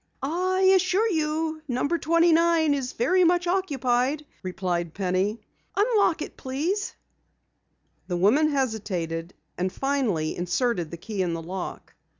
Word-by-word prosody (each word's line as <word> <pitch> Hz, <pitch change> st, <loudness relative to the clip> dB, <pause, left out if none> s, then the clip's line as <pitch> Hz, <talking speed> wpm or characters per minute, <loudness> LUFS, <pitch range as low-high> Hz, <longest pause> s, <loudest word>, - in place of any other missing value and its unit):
"I 365 Hz, +6 st, 0 dB
assure 375 Hz, +4 st, +2 dB
you 315 Hz, -1 st, -1 dB
number 285 Hz, +6 st, 0 dB
29 335 Hz, -1 st, +4 dB
is 270 Hz, -3 st, -3 dB
very 365 Hz, +11 st, +3 dB
much 350 Hz, +1 st, +3 dB
occupied," 285 Hz, -6 st, 0 dB, 0.2 s
replied 180 Hz, -3 st, -3 dB
Penny. 195 Hz, +3 st, 0 dB, 0.3 s
"Unlock 410 Hz, -6 st, +2 dB
it, -, -, -9 dB
please." 320 Hz, +10 st, -2 dB, 1.1 s
The 180 Hz, -, -1 dB
woman 230 Hz, -, +4 dB
hesitated, 190 Hz, -, -2 dB, 0.2 s
and 185 Hz, +1 st, 0 dB
finally 240 Hz, -, -1 dB
inserted 180 Hz, 0 st, -1 dB
the 170 Hz, -, -7 dB
key 205 Hz, +2 st, -4 dB
in 175 Hz, -2 st, 0 dB
the 165 Hz, -, -5 dB
lock. 185 Hz, +2 st, -6 dB
270 Hz, 125 wpm, -25 LUFS, -, 1.1 s, 29